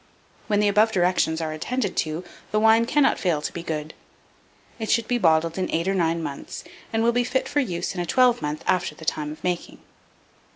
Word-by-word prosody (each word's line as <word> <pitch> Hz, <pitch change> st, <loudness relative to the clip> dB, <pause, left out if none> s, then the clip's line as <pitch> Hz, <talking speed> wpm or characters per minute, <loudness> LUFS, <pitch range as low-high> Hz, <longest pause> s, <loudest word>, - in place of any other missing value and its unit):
When 205 Hz, -2 st, +2 dB
the 210 Hz, -, +3 dB
above 210 Hz, +2 st, +4 dB
directions 175 Hz, -3 st, +1 dB
are 160 Hz, -1 st, -2 dB
attended 210 Hz, +5 st, -2 dB
to, 155 Hz, +2 st, -1 dB, 0.3 s
the 215 Hz, -, +1 dB
wine 225 Hz, +1 st, +5 dB
cannot 295 Hz, +1 st, +3 dB
fail 170 Hz, -5 st, +1 dB
to 150 Hz, -, -5 dB
be 170 Hz, -, -5 dB
good. 155 Hz, -2 st, -4 dB, 0.9 s
It 220 Hz, -, -4 dB
should 230 Hz, -1 st, +2 dB
be 245 Hz, -1 st, +1 dB
bottled 165 Hz, -1 st, +2 dB
in 185 Hz, -, -1 dB
8 170 Hz, +3 st, 0 dB
or -, -, +1 dB
9 165 Hz, -3 st, 0 dB
months, 140 Hz, -3 st, -6 dB, 0.3 s
and 225 Hz, 0 st, +1 dB
will 235 Hz, -, +4 dB
be 245 Hz, +1 st, +1 dB
fit 260 Hz, +2 st, -1 dB
for 290 Hz, -, 0 dB
use 180 Hz, -11 st, -2 dB
in 180 Hz, -, -3 dB
a -, -, -2 dB
twelve 250 Hz, +2 st, +3 dB
month 150 Hz, +1 st, -3 dB
after 180 Hz, -4 st, 0 dB
the 160 Hz, -, -11 dB
time 150 Hz, -1 st, -1 dB
of 155 Hz, -, -11 dB
making. 180 Hz, -1 st, -3 dB
180 Hz, 215 wpm, -24 LUFS, 160-225 Hz, 0.9 s, wine